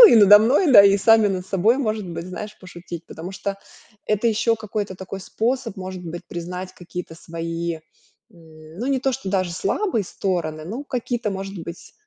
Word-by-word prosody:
Ну 470 - +14
и - - +6
надо 205 -1 +9
мной, 270 - +3
да, 200 - +11
и 200 0 +6
сами 220 +2 +5
над 185 -2 -3
собой, 200 +5 +3
может 215 -6 -1
быть, 170 0 -6
знаешь, 205 +3 -7
пошутить. 175 -2 -9
Потому 175 +4 -8
что 195 0 -4 0.5
это 215 +2 +1
ещё 230 +1 +2
какой-то 210 -2 -4
такой 190 +1 -7
способ, 230 +2 -2
может 185 -1 -6
быть, 170 +1 -6
признать 180 +2 -6
какие-то 175 -2 -8
свои, 165 0 -4 0.6
м, 160 -1 -15
ну, 240 - -3
не 270 -1 +1
то, 265 0 +1
что 255 -6 -5
даже 185 -3 0
слабые 220 - 0
стороны, 165 -5 -3
ну, 230 - -5
какие-то, 240 -4 -2
может 195 0 -5
быть 170 +1 -9
195 Hz, 185 wpm, -22 LUFS, 175-220 Hz, 0.6 s, Ну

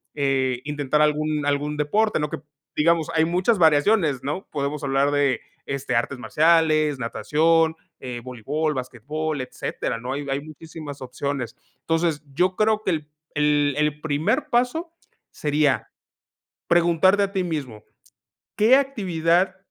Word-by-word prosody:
eh, 130 -3 0
intentar 145 0 0
algún 150 0 +1
algún 145 +1 -1
deporte, 210 +9 +1
¿no?, 150 -1 -1
que - - -4 0.4
digamos, 165 +1 +2
hay 160 - +4
muchas 180 +6 +1
variaciones, 155 - +3
¿no?, 150 +8 -4
podemos 145 0 -3
hablar 140 +1 +2
de, 140 -4 +1 0.2
este, 140 -3 -3
artes 125 +3 0
marciales, 155 +3 +3
natación, 160 +6 +2 0.2
eh, 125 -2 -6
voleibol, 140 +6 -2
basquetbol, 140 +4 -4
etcétera, 125 - -4
¿no?, 125 +2 -4
hay 145 +1 -4
hay 135 - 0
muchísimas 155 -2 -10
opciones. 130 -1 -4 0.3
Entonces, 165 -2 0
yo 180 +5 +1
creo 215 +1 +2
que 190 - 0
el 155 -2 -3 0.3
el 145 -1 +2
el 150 0 0
primer 205 - 0
paso 255 +8 0 0.4
sería 150 -1 0 0.8
preguntarte 175 +4 +4
a 195 - -2
ti 190 -2 0
mismo: 140 -11 -5 0.7
"¿Qué 230 +5 +6
actividad 185 - +1
150 Hz, 135 wpm, -23 LUFS, 140-170 Hz, 0.8 s, Qué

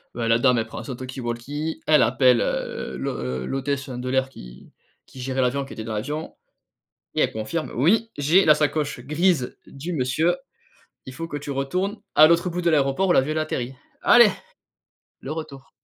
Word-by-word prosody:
Ben, 115 -1 -2
la 115 0 +4
dame 125 -1 +4
elle 110 - -1
prend - - -7
son 130 - -6
talkie 130 +1 -7
walkie, 140 +7 -4
elle 155 -1 +5
appelle, 125 +1 +4
heu, - - -3
l'hô - - -2
heu, 65 -1 -3
l'hôtesse 135 0 -2
de 125 0 -5
l'air 130 0 +1
qui - - -13 0.3
qui 130 - -11
gérait 130 +1 -1
l'avion, 130 +2 +1
qui 135 - -10
était 110 - -6
dans 110 0 -5
l'avion 150 +9 -4 0.8
et - - 0
elle - - +1
confirme: 110 +10 -4
«Oui, 220 - +2
j'ai 160 +7 +4
la 155 - +7
sacoche 150 -3 -1
grise 150 +1 0
du 160 +6 -7
monsieur. 155 +5 +1 0.7
Il 130 - -8
faut 165 +4 -5
que 145 - -6
tu 145 0 -6
retournes 180 +10 -2 0.2
à 155 - +9
l'autre 170 +2 +2
bout 175 +1 -3
de 170 - +2
l'aéroport 145 +4 +2
où - - +5
l'avion, 150 -1 +3
il - - -3
a - - +2
atterri». 130 -5 -3 0.3
Allez! - - +7 0.9
Le 135 - -7
retour. 140 -4 -8
135 Hz, 195 wpm, -23 LUFS, 125-155 Hz, 0.9 s, à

